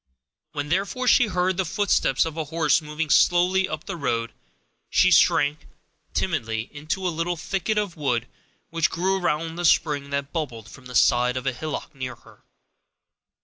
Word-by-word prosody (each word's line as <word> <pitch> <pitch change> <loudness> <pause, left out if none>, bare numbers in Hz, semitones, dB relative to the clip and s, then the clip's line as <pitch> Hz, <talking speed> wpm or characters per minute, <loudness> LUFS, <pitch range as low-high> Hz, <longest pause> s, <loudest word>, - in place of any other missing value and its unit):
When, 145 0 -4
therefore, 200 +9 -1
she 245 - +5
heard 180 -1 0
the 190 - +1
footsteps 195 - +1
of 160 -2 -5
a 160 -1 -3
horse 160 0 +2
moving 150 0 -4
slowly 180 +2 +4
up 155 +1 -5
the 195 - -5
road, 115 -7 -2 0.6
she - - +4
shrank, 145 +4 +3 0.5
timidly, 115 -10 -2
into 155 +6 -3
a 175 - -1
little 170 +2 -2
thicket 195 +5 -2
of 205 -5 -1
wood 125 -7 -1 0.5
which 165 -1 +1
grew 190 +3 0
around 165 0 -1
the 175 - -3
spring 145 -4 +2
that 140 0 -3
bubbled 120 - -4
from 130 -1 -13
the 125 - -9
side 125 +2 +3
of 130 - -5
a 135 - 0
hillock 150 +4 -5
near 130 -2 -5
her. - - -20
155 Hz, 170 wpm, -24 LUFS, 140-180 Hz, 0.6 s, she